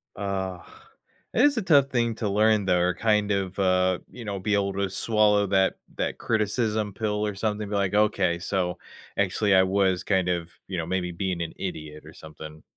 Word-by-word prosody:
Ugh. 95 -3 -3 0.7
It - - +2
is 285 -4 +3
a 220 - 0
tough 145 -6 +5
thing 120 -3 0
to 105 -3 -2
learn, 105 0 +3
though, 90 -2 +2
or 90 0 +2
kind 105 0 +1
of, 95 -1 -2
uh, 90 -1 +2
you 120 - -9
know, 100 -2 -4
be 105 +2 -1
able 100 -1 +1
to 100 0 -1
swallow 105 0 +2
that 95 -1 +2 0.2
that - - -2
criticism 110 -1 0
pill 105 -1 -1
or 105 - -2
something, 105 +1 -2
be 105 - -6
like, 100 0 0
"Okay, 100 -5 +2
so, 90 0 -2 0.4
actually, 100 0 +2
I 95 - +6
was 95 -1 +1
kind 95 -3 +1
of, 85 -1 -2 0.2
you 95 -2 -4
know, 80 - -2
maybe 90 0 -2
being 90 0 -3
an 80 - -4
idiot 75 -1 -6
or - - -12
something." 80 0 -11
100 Hz, 195 wpm, -25 LUFS, 90-105 Hz, 0.7 s, I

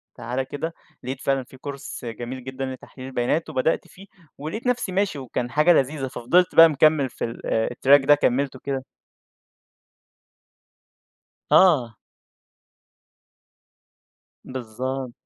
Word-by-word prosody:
تعال 125 +3 -3
كده، 145 +5 -5 0.3
لقيت 130 +2 -5
فعلًا 135 -1 0
في 130 - -16
Course 140 -2 -7
جميل 120 +2 -6
جدًا 130 +1 -5
لتحليل 130 0 -9
البيانات، 135 +5 -1
وبدأت 150 +2 0
فيه، 195 +2 -15 0.3
ولقيت 160 - -5
نفسي 245 -6 0
ماشي 190 -5 0
وكان 125 -1 -4
حاجة 150 +6 +5
لذيذة، 135 -2 0
ففضلت 170 +9 +1
بقى 165 0 +9
مكمل 150 -2 +3
في - - -7
ال 115 - -7 0.3
الTrack 135 +2 +5
ده 145 - +7
كمِّلته 135 -1 0
كده 135 -1 -4 2.7
آه. 130 -12 +5 2.5
بالضبط. 130 +1 -5
135 Hz, 115 wpm, -23 LUFS, 130-155 Hz, 2.7 s, بقى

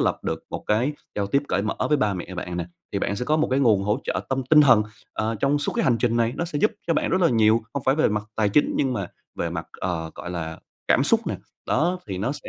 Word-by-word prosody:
lập - - +1
được - - -3
một - - -5
cái 120 +8 +2 0.2
giao 100 -1 -1
tiếp 140 +7 +1
cởi 95 +2 +1
mở 110 - -1
với 150 - +4
ba 105 -7 +1
mẹ 90 +1 -6
bạn 90 -1 -4
nè, 85 -1 -3 0.3
thì 100 - 0
bạn 100 +1 -1
sẽ 125 - -2
có 155 +3 +2
một 155 - +1
cái 130 +2 +2
nguồn 110 -7 +4
hỗ 105 +5 +1
trợ - - -1
tâm 135 0 0
tinh 155 -1 +8
thần, 120 -7 +6 0.3
ờ, 110 +1 -1
trong 140 +7 +1
suốt 145 - -2
cái - - 0
hành 120 -3 +3
trình 120 -1 +1
này, 115 0 +2
nó 170 - -1
sẽ 150 -4 -3
giúp 215 - +3
cho 165 - +2
bạn - - 0
rất 185 - +2
là 170 - +5
nhiều, 110 -1 +4
không 140 -3 -3
phải 135 - +5
về 155 - +3
mặt 105 0 -1
tài 105 -2 +2
chính 145 +9 +3
nhưng 135 -2 +1
mà 100 -6 -2 0.3
về - - -1
mặt, - - -4
ờ, 80 -3 -2
gọi 85 - -7
là, 80 -2 -5 0.3
cảm - - +4
xúc - - +2
nè, - - -1 0.3
đó 175 +6 +1
thì 95 -2 -4
nó 120 +8 -1
sẽ - - -9
115 Hz, 290 wpm, -24 LUFS, 100-140 Hz, 0.3 s, tinh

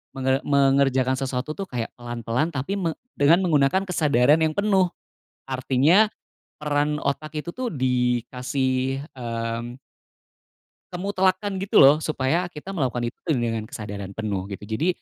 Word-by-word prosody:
Menge 130 0 +1
mengerjakan 135 -2 +3
sesuatu 135 +2 -3
tuh 195 - -4
kayak 120 -6 -4
pelan-pelan 120 +6 -2
tapi 145 +9 -2
me 165 -3 -1 0.2
dengan 155 +5 +5
menggunakan 155 +3 +3
kesadaran 150 -5 +3
yang 160 -1 +1
penuh, 195 -3 +3 0.6
artinya 135 - +3 0.5
peran 150 0 0
otak 155 +2 -3
itu 150 - -4
tuh 255 -1 -3
dikasih, 130 +1 0 0.2
mmm 115 0 -4 1.2
kemutlakan 190 +1 0
gitu 195 -6 +5
loh 145 +3 +7
supaya 155 +3 0
kita 175 +3 -9
melakukan 130 -9 -1
itu - - -53 0.2
dengan 115 -3 -2
kesadaran 100 -3 -7
penuh 100 -3 -3
gitu. 100 0 -8
Jadi 110 +10 -2
135 Hz, 130 wpm, -24 LUFS, 125-160 Hz, 1.2 s, loh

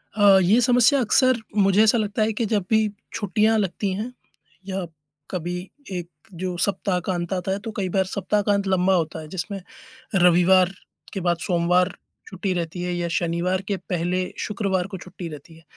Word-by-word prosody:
अ, 200 -2 +6
ये 210 +7 +4
समस्या 245 +3 +4
अक्सर 255 +2 +4 0.2
मुझे 195 +1 +4
ऐसा 220 +2 +4
लगता 215 0 -1
है 220 - 0
कि 230 +2 -1
जब 205 -3 0
भी 220 -1 +3 0.3
छुट्टियाँ 215 +1 +2
लगती 195 0 -1
हैं 220 +6 -4 0.6
या 190 -1 -3 0.5
कभी 175 -1 -3 0.4
एक 175 -2 -4 0.3
जो 185 -1 -2
ससप्ताह 190 0 0
का 190 - +1
अंत 175 0 -3
आता 185 0 -2
है 195 - -1
तो - - -3
कई 190 -3 -1
बार 190 +1 +1
सप्ताह 200 +2 -1
का 205 0 +1
अंत 200 -1 0
लंबा 190 0 +3
होता 160 -2 -1
है, 155 - -9
जिसमें 190 +4 -5 0.5
रविवार 180 0 +5 0.4
के 195 - -2
बाद 175 -1 +1
सोमवार 180 +1 +2 0.3
छुट्टी 195 - -2
रहती 175 0 -3
है 180 0 -2
या 175 0 -2
शनिवार 175 +2 0
के 200 - 0
पहले 180 +1 -1
शुक्रवार 195 -3 -1
को 195 - -7
छुट्टी 180 -1 -8
रहती 155 +1 -11
है। 165 - -19
190 Hz, 185 wpm, -23 LUFS, 175-205 Hz, 0.6 s, अ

